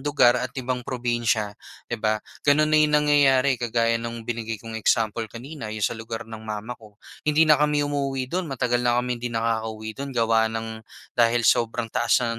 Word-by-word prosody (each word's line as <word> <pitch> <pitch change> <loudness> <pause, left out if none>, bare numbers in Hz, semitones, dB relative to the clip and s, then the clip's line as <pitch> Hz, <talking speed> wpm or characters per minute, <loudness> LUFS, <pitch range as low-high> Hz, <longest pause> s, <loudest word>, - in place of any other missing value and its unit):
lugar 135 -4 +3
at 125 +1 -5
ibang 125 -1 -2
probinsiya, 120 -4 -1 0.3
'di 120 -2 -5
ba, 110 0 +2 0.3
gano'n 145 +2 +5
na 155 - +6
'yong 150 0 +4
nangyayari 140 -3 +3
kagaya 115 -1 +1
nung 115 -1 -6
binigay 115 -1 -3
kong 115 +2 -10
example 110 0 +1
kanina, 120 +2 -8
'yong 105 -2 -3
sa - - +1
lugar 115 0 -6
ng 110 0 -9
mama 110 +1 -5
ko, 105 -2 -17 0.3
hindi 150 +2 +5
na 150 -2 +5
kami 150 -1 +2
umuuwi 140 -2 -1
do'n 180 -1 -1
matagal 125 -2 0
na 120 -1 +2
kami 125 -1 -1
hindi 120 - -2
nakakauwi 110 -1 -2
do'n 135 +2 -7
gawa 115 -1 +3
ng 110 0 -5 0.3
dahil 120 0 +2
sobrang 115 0 +1
taas 125 - +2
na 115 - -1
120 Hz, 190 wpm, -24 LUFS, 115-135 Hz, 0.3 s, na